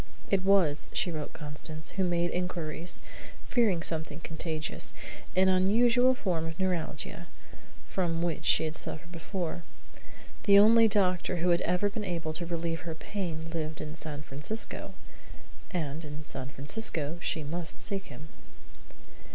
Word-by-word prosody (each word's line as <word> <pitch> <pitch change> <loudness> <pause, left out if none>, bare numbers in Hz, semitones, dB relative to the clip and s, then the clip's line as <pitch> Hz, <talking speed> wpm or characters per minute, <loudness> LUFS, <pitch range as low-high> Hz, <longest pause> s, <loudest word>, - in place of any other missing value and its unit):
It 195 -2 +3
was, 185 -7 +4
she 175 - +1
wrote 155 -2 -4
Constance 155 +1 -2
(who 195 - 0
made 175 -1 +1
inquiries, 175 -2 -2 0.4
fearing 210 -10 +2
something 160 -2 +1
contagious), 160 -1 -3 0.4
an 190 +1 +5
unusual 235 +7 +5
form 175 -8 -1
of 160 0 -6
neuralgia, 170 -2 -2 0.6
from 170 -3 0
which 165 -2 -1
she 160 - +5
had 155 - -2
suffered 170 +2 0
before. 170 0 -4 0.8
The 200 -1 +8
only 225 +2 +8
doctor 185 -3 +2
who 175 +1 +1
had 170 0 +4
ever 180 +4 +2
been 210 +1 -3
able 170 -4 -2
to 170 +2 -3
relieve 165 -1 -2
her 165 -1 -5
pain 165 -3 -4
lived 155 -1 -3
in 155 0 -5
San 155 -2 -5
Francisco, 145 +12 -4 0.7
and 160 -4 -3
in 150 0 -7
San 130 -1 -4
Francisco 150 - 0
she 160 - -1
must 160 +3 -4
seek 195 -1 -2
him. 155 +1 -10
170 Hz, 145 wpm, -30 LUFS, 155-190 Hz, 0.8 s, The